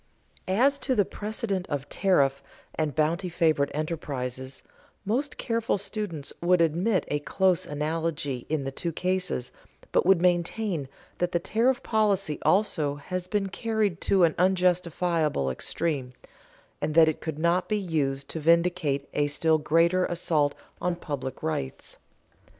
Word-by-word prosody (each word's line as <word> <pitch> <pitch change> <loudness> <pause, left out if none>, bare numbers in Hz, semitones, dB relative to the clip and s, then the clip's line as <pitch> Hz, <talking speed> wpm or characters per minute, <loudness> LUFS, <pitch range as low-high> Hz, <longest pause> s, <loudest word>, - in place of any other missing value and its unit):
As 260 +9 +3
to 260 - 0
the 205 - +3
precedent 205 -3 -3
of 145 -1 -3
tariff 140 -8 +2 0.3
and 155 -3 -2
bounty 165 +4 +1
favored 160 -5 +2
enterprises, 135 -4 -4 0.4
most 260 +8 -1
careful 230 -2 0
students 195 -7 -5
would 180 +1 +4
admit 175 +5 +2
a 145 - 0
close 185 +3 +1
analogy 150 -3 -2
in 155 -2 0
the 135 - -3
two 170 +5 -3
cases, 180 -6 -1 0.4
but - - +3
would 190 0 +5
maintain 175 -2 0 0.3
that 175 0 0
the 170 - +2
tariff 240 +8 +1
policy 200 -8 +1
also 165 -9 +2
has 180 +5 -5
been 195 0 -1
carried 215 -4 -1
to 190 -2 +3
an 165 -2 +4
unjustifiable 175 - +1
extreme, 135 - -2 0.7
and 155 - -2
that 165 -1 +7
it 155 - -1
could 160 -3 -4
not 170 +3 +1
be 215 - +2
used 145 -8 -1
to 160 - -4
vindicate 165 -3 +2
a 145 0 +2
still 155 +2 +2
greater 170 +4 +3
assault 155 -4 0 0.3
on 180 -1 0
public 140 -6 -5
rights. 70 -4 -4
170 Hz, 140 wpm, -27 LUFS, 145-190 Hz, 0.7 s, that